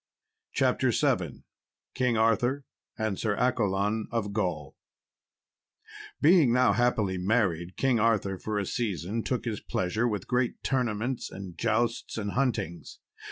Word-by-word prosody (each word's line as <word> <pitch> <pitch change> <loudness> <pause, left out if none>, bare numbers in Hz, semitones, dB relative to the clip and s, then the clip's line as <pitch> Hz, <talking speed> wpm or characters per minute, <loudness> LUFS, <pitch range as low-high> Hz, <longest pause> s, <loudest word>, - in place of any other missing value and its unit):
CHAPTER - - +2
VII - - 0 0.5
King 125 -3 +1
Arthur 120 +5 +2 0.3
and 110 -4 -2
Sir 110 -2 0
Accolon 110 -3 0
of 105 -3 -2
Gaul 85 -9 -2 1.4
Being 155 -5 +5
now 125 +1 +4
happily 110 -6 +1
married, 90 -4 0
King 130 -3 +2
Arthur 105 -4 +1
for 105 +2 -3
a 100 - 0
season 105 -1 -2
took 125 0 -2
his 110 -4 -2
pleasure, 110 +6 -1
with 105 -5 -3
great 125 -1 0
tournaments, 125 -1 -1
and 95 -3 -8
jousts, 115 +4 -1
and 100 -2 -2
huntings. 110 -10 -2
110 Hz, 125 wpm, -28 LUFS, 100-120 Hz, 1.4 s, Being